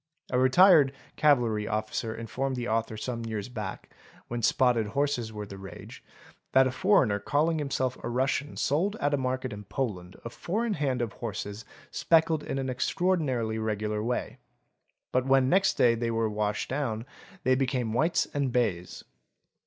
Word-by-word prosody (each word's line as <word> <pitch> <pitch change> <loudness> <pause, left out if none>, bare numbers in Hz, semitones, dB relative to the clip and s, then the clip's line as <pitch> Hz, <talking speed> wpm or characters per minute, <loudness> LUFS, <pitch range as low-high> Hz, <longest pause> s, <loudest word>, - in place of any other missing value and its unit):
<A 125 - +2
retired 145 +1 +6 0.2
cavalry 120 -8 +2
officer 110 +1 -2
informed 130 +4 -3
the 120 -1 -3
author 110 -1 -1
some 115 +1 -4
years 110 -1 -4
back, 105 -6 -6 0.4
when 120 0 -3
spotted 115 -1 +3
horses 125 -1 -1
were 105 -1 -6
the 100 -1 -10
rage, 95 0 -10 0.5
that 130 0 +6
a 130 - 0
foreigner 130 - +3
calling 155 +9 +1
himself 130 -3 -1
a - - -3
Russian 135 +4 -1
sold 180 +9 +1
at 145 -8 -1
a - - +3
market 130 -2 -2
in 105 0 -8
Poland 95 -7 -4
a 115 - -5
four 210 - -2
in 225 - 0
hand 135 -7 0
of 115 - -4
horses 105 -1 -6 0.3
speckled 160 -2 +3
in 135 - -4
an 135 -1 -2
extraordinarily 130 -5 0
regular 105 -1 -2
way; 120 +2 -3 0.7
but 130 +1 +1
when 135 -1 +4
next 195 +4 +3
day 120 -1 +4
they 115 0 -2
were 115 -1 +1
washed 105 0 -1
down 120 -5 -2 0.4
they 130 - +3
became 130 -4 0
whites 160 +8 +2
and 140 -3 0
bays! 100 -8 -1
125 Hz, 165 wpm, -28 LUFS, 110-140 Hz, 0.7 s, retired